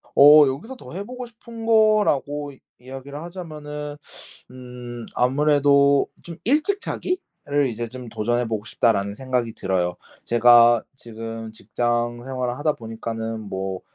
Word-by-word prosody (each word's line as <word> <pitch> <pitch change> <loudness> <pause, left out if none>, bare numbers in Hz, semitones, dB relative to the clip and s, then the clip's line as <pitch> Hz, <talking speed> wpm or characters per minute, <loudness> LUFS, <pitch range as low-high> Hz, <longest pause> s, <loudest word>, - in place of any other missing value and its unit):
어 150 +2 +9
여기서 160 - -4
더 250 - -12
해보고 245 +7 -6
싶은 230 0 -10
거라고 210 -11 +2
이 135 - -20 0.2
이야기를 135 +3 -8
하자면은 150 -4 -7 0.6
음 125 -2 -9
아무래도 140 +1 +4 0.2
좀 170 -1 -9
'일찍 310 - +2
자기를 170 - -2
이제 120 -1 -4
좀 125 0 -9
도전해 120 +3 -1
보고 110 -2 -3
싶다.'라는 100 -5 +1
생각이 125 -1 -2
들어요. 90 -3 -1 0.3
제가 120 0 +6
지금 115 -2 -7
직장 120 +1 -2
생활을 125 -1 -3
하다 150 +1 +1
보니까는 115 -1 -5
뭐 95 -2 -4
130 Hz, 290 characters per minute, -23 LUFS, 115-150 Hz, 0.6 s, 어